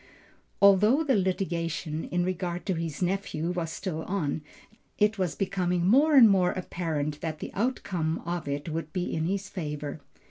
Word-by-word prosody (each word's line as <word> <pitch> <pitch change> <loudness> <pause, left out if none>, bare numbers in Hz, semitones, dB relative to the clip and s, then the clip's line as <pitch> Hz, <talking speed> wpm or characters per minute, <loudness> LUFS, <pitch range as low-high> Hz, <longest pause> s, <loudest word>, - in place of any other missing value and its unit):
Although 210 +9 +6
the 275 -5 +2
litigation, 170 -4 -1
in 175 0 0
regard 180 -1 -3
to 190 - 0
his 165 -1 -3
nephew 180 -3 -1
was 175 -2 -2
still 175 -5 -4
on, 160 -6 -1 0.6
it 210 -1 +2
was 180 -3 0
becoming 180 -3 0
more 285 - +5
and 250 -5 +10
more 190 -3 +3
apparent 155 -5 -3
that 160 -2 -3
the - - -7
outcome 185 -8 -1
of 170 -2 -3
it 140 +2 -3
would 160 -1 -4
be 180 -1 -2
in 160 0 -1
his 195 +2 -2
favor. 150 -4 -5
180 Hz, 165 wpm, -28 LUFS, 160-195 Hz, 0.6 s, and